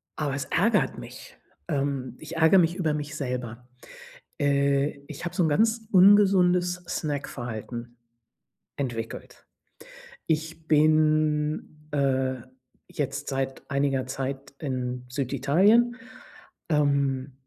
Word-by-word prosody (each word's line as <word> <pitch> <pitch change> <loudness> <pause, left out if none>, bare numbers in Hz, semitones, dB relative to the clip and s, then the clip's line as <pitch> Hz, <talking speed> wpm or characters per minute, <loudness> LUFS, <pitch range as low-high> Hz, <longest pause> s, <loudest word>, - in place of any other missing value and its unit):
aber 145 -3 -2
es 140 - -3
ärgert 205 +3 +1
mich. - - -11 0.3
Ähm, 135 -3 -2
ich - - -8
ärgere 160 +4 +6
mich 170 0 +2
über 165 -5 0
mich 150 0 -4
selber. 125 -3 -5 0.7
Äh, 140 0 +1
ich 150 +2 -8
habe 175 - -4
so 180 - +2
'n - - +2
ganz 220 +7 +1
ungesundes 185 -2 +5
Snack-Verhalten 120 -5 -5 0.8
entwickelt. 120 -5 -6 0.8
Ich 160 0 -2
bin, 155 0 +2
äh, 130 -2 +1 0.5
jetzt 140 0 -4
seit 135 -1 -3
einiger 140 -2 0
Zeit 135 +1 -5
in 125 -3 -4
Süditalien, 150 - +2 0.7
ähm 140 -3 +1
145 Hz, 105 wpm, -26 LUFS, 135-160 Hz, 0.8 s, ärgere